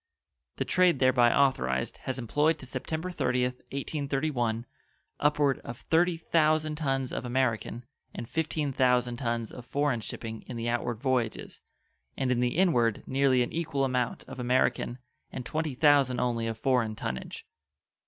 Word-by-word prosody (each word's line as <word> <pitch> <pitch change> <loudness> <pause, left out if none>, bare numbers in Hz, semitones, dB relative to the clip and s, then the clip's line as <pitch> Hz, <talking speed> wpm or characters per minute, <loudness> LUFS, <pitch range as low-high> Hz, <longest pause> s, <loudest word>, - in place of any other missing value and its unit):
The - - -2
trade 180 -4 +3
thereby 130 -2 +4
authorized 65 - +1
has 130 - -2
employed 145 +7 +1
to 135 - -10
September 160 +6 -4
30th, 125 -6 0
1831 135 -5 -1 0.5
upward 145 -2 +2
of 120 - -8
30 170 +4 +2
thousand 155 -1 +2
tons 135 -4 -1
of - - -3
American 120 -2 -1 0.3
and 115 - -7
15 155 -2 -1
thousand 125 -2 +2
tons 115 -2 -2
of 125 - -9
foreign 140 -2 0
shipping 110 +1 -6
in 125 - -6
the 115 0 -3
outward 120 -1 -1
voyages, 130 -4 -1 0.6
and 130 -1 0
in 125 - +1
the 125 +4 0
inward 120 - +2
nearly 135 -2 +3
an 120 - -6
equal 160 -4 -1
amount 125 -2 -1
of - - -10
American 125 0 +1 0.3
and 125 - -6
20 155 0 -2
thousand 140 -3 +4
only 120 -2 0
of 115 -1 -3
foreign 120 -3 +1
tonnage. 65 - -5
130 Hz, 150 wpm, -28 LUFS, 120-145 Hz, 0.6 s, thereby